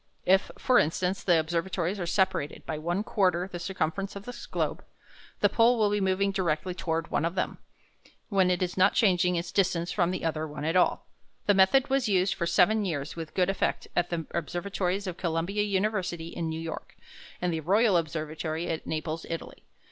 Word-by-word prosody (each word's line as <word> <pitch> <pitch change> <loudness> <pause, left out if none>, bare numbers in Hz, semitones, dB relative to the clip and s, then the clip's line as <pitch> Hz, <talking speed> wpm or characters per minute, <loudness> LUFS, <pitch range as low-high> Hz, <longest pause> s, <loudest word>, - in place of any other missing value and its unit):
If, 190 +2 +4
for 255 -1 +4
instance, 180 +5 0
the 175 -3 +4
observatories 175 +3 -1
are 175 - -3
separated 175 -5 0
by 155 - -3
one 175 +6 -1
quarter 185 -4 +1
the 175 - -5
circumference 190 +2 -2
of 200 0 -8
the 245 - -7
globe, - - -2 0.6
the - - +6
pole 235 +1 +4
will 210 -2 +2
be 205 0 +1
moving 190 +1 +1
directly 180 -2 -1
toward 165 -2 -2
one - - +1
of 170 +2 -1
them, 185 - -2 0.7
when 190 -3 +3
it 180 0 +1
is 180 - -3
not 190 +1 +4
changing 180 -4 +3
its 170 +1 -3
distance 180 -3 +1
from 175 -4 +1
the 180 -2 -3
other 160 -1 -1
one 150 0 -6
at 165 +3 0
all. 180 - +3 0.4
This 205 - +4
method 255 +9 +4
was 270 -4 +2
used 185 -1 +2
for 170 - -2
seven 210 +5 +4
years 155 -7 -3
with 165 -2 -7
good 180 -2 +3
effect 195 - -1
at 175 0 +1
the 165 -2 -3
observatories 180 +3 -2
of 180 -2 -4
Columbia 170 +4 -1
University 190 -4 -1
in 170 -1 -3
New 160 0 -3
York, 165 0 -6 0.4
and 180 -1 0
the 160 - -1
Royal 200 +6 +3
Observatory 160 0 -2
at 160 - -3
Naples, 160 +1 -3
Italy. 165 0 -6
180 Hz, 195 wpm, -28 LUFS, 165-195 Hz, 0.7 s, the